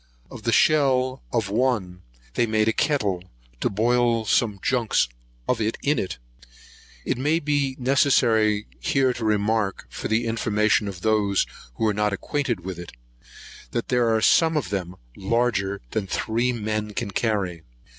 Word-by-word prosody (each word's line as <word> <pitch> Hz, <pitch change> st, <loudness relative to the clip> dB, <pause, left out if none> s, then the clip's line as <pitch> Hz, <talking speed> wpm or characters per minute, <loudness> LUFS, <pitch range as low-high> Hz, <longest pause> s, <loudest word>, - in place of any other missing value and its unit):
Of -, -, -9 dB
the -, -, 0 dB
shell 130 Hz, -3 st, +3 dB
of 110 Hz, -4 st, -1 dB
one 105 Hz, -7 st, 0 dB, 0.3 s
they 120 Hz, -, +1 dB
made 110 Hz, 0 st, +1 dB
a 110 Hz, -, +3 dB
kettle, 105 Hz, -, 0 dB, 0.4 s
to -, -, +1 dB
boil 115 Hz, +2 st, +2 dB
some 105 Hz, -1 st, +1 dB
junks 120 Hz, -, +2 dB, 0.4 s
of 125 Hz, -3 st, 0 dB
it 110 Hz, +1 st, -1 dB
in. 150 Hz, +2 st, +2 dB, 1.1 s
(It -, -, -1 dB
may 150 Hz, +5 st, +2 dB
be 145 Hz, -4 st, 0 dB
necessary 115 Hz, -6 st, +3 dB
here 130 Hz, -2 st, +2 dB
to 120 Hz, -, -6 dB
remark, 105 Hz, -3 st, 0 dB
for -, -, -4 dB
the 110 Hz, +2 st, +1 dB
information 110 Hz, -2 st, +1 dB
of 95 Hz, -3 st, -7 dB
those 105 Hz, -2 st, +2 dB, 0.3 s
who -, -, -1 dB
are 105 Hz, -, +2 dB
not 105 Hz, 0 st, 0 dB
acquainted 125 Hz, 0 st, -2 dB
with 90 Hz, -1 st, -6 dB
it, 85 Hz, -, -9 dB, 0.8 s
that 120 Hz, -, -2 dB
there 125 Hz, -2 st, +2 dB
are 110 Hz, -, +1 dB
some 160 Hz, +6 st, +4 dB
of 135 Hz, -12 st, -2 dB
them 90 Hz, -2 st, -3 dB, 0.2 s
larger 100 Hz, -2 st, 0 dB
than 105 Hz, -3 st, -2 dB
three 115 Hz, +6 st, 0 dB
men 110 Hz, -2 st, -3 dB
can 115 Hz, -5 st, -3 dB
carry.) 95 Hz, -6 st, -1 dB
110 Hz, 155 wpm, -24 LUFS, 105-125 Hz, 1.1 s, some